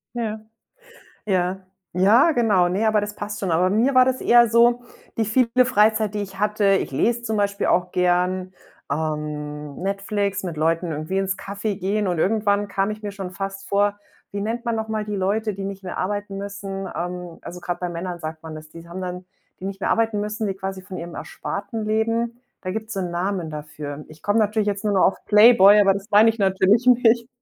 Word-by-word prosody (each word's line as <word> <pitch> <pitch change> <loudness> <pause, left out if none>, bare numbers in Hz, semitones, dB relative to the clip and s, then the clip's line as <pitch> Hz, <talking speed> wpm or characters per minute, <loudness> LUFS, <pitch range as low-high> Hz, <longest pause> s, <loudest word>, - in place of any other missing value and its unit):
Ja. 220 -2 -3 0.9
Ja. 185 -1 0 0.3
Ja, 220 - +5
genau. 210 -8 +3
Ne, 195 +5 0
aber 215 -1 +3
das 205 0 -5
passt 205 0 -5
schon. 190 - -2
Aber 180 +3 +2
bei 205 - +1
mir 255 +5 +2
war 255 0 +7
das 260 0 0
eher 240 0 +5
so, 235 +2 +4 0.3
die 225 - +1
viele 250 +3 +3
Freizeit, 215 -2 +2
die 210 - -1
ich 195 -1 -9
hatte 210 0 0
ich - - -2
lese 230 - 0
zum 220 -2 -2
Beispiel 200 -1 0
auch 180 0 +1
gern, 180 +1 +1 0.4
ähm, 150 -1 -4
Netflix, 200 0 -2
mit 170 -4 -5
Leuten 165 +2 0
irgendwie 155 +6 -3
ins 195 0 -1
Café 200 0 -4
gehen, 200 +2 -1
und 175 -2 -1
irgendwann 205 +2 +1
kam 195 0 0
ich 215 0 -6
mir 205 - -4
schon 195 -2 -6
fast 195 +1 -6
vor 205 0 +1 0.3
wie 200 0 -4
nennt 230 +3 -3
man 230 -1 0
noch 220 0 -3
mal 215 -1 -2
die 210 - -3
Leute, 205 +3 0
die 195 +1 -6
nicht 195 0 -6
mehr 185 - -6
arbeiten 205 +1 -3
müssen? 195 -1 -5
Ähm, 175 -1 -5
also 180 +1 -9
grad 175 0 -4
bei 180 - -2
Männern 175 +1 -5
sagt 155 0 -6
man 160 -1 -8
das. 155 0 -10
Die 165 - -12
s 165 - -14
haben 175 +2 -7
dann 180 0 -5 0.3
die - - -10
nicht 195 0 -5
mehr - - -1
arbeiten 225 -2 +1
müssen, 210 +1 -3
die 195 - -1
quasi 190 0 -6
von 185 0 -8
ihrem 170 0 -7
Ersparten 215 +2 -5
leben. 230 +2 0 0.2
Da 185 - -4
gibt's 220 +3 -5
so 195 - -2
'n 180 -2 -3
Namen 175 -1 -2
dafür. 150 -1 -7
Ich 155 0 -15
komm 205 +1 +1
natürlich 215 -1 +2
jetzt 200 +1 -2
nur 210 - +1
noch 190 - +4
auf 195 - -2
Playboy, 210 -1 +7
aber 195 -1 +4
das 200 +1 -6
mein 210 +2 +6
ich 225 0 0
natürlich 195 +4 +3
nicht. 235 -1 +4
200 Hz, 215 wpm, -22 LUFS, 180-215 Hz, 0.9 s, war